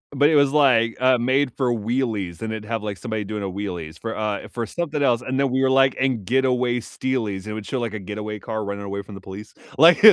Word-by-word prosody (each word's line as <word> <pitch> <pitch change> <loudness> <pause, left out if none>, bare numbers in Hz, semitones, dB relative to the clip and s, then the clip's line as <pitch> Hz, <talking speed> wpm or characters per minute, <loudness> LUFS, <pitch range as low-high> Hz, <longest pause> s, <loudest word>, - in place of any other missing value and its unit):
but 145 +2 +5
it 160 - +3
was, 140 -1 +5
like, 125 -6 +4
uh, 130 -1 +5
made 130 +3 +1
for 125 -3 +1
wheelies, 110 -6 -2
and 110 0 -3
it'd 110 -1 -5
have, 115 0 -2
like, 105 -2 -4
somebody 110 -2 -4
doing 105 0 -4
a - - -2
wheelies 90 -5 -5
for, 115 -1 -4
uh, 105 -1 -2
for 120 -1 -4
something 150 0 -2
else, 120 -2 +3
and 130 +1 -3
then 140 -2 +2
we 130 +1 +1
were 135 - +3
like 135 0 +4
and 130 -6 0
getaway 125 0 +2
steelies. 110 -6 -3
It 105 - -5
would 110 -1 -6
show, 130 - -2
like, 115 -3 -3
a 110 - -4
getaway 105 +2 -5
car 110 0 -4
running 100 0 -5
away 100 0 -4
from 100 0 -11
the 95 - -10
police, 100 +3 -10 0.2
like, 165 +7 +7
115 Hz, 250 wpm, -23 LUFS, 105-130 Hz, 0.2 s, like